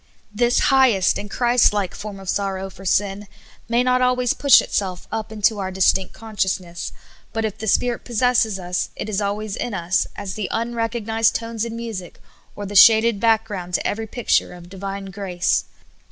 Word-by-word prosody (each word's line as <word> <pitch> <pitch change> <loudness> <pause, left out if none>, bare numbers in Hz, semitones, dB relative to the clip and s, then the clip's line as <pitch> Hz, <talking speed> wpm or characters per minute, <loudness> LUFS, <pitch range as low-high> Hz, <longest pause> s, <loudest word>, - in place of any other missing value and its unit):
This 240 +3 +2 0.2
highest 245 -8 +4
and 205 - -7
Christ 240 0 +3
like 200 -4 -1
form 205 -1 -8
of 195 - -11
sorrow 195 0 -2
for 195 +1 -13
sin 200 +2 0 0.4
may 240 +1 +2
not 255 0 +2
always 250 -1 +2
push 280 -2 +6
itself 185 -3 -3
up 220 -1 -4
into 215 0 +1
our 190 -1 -2
distinct 190 0 +2
conscious 210 -4 -2
ness, 175 -1 -7 0.4
but 225 0 -1
if 220 0 -5
the 220 - -5
Spirit 240 +3 +1
possesses 235 -3 +1
us, 180 -1 -3
it - - -5
is 210 -1 -1
always 205 +1 -3
in 240 -4 -4
us 175 +1 0
as 190 -2 -5
the 210 -3 -3
unrecognized 225 -1 0
tones 230 -1 -3
in 230 -1 -6
music, 225 -7 -7 0.4
or 205 - -6
the 205 +1 -7
shaded 220 +1 +7
back 225 0 +3
ground 180 -5 -5
to - - -1
ever} 220 +1 -3
picture 240 -3 0
of 175 -1 -12
Divine 195 +1 -6
grace. 180 -3 -1
210 Hz, 180 wpm, -21 LUFS, 195-230 Hz, 0.4 s, shaded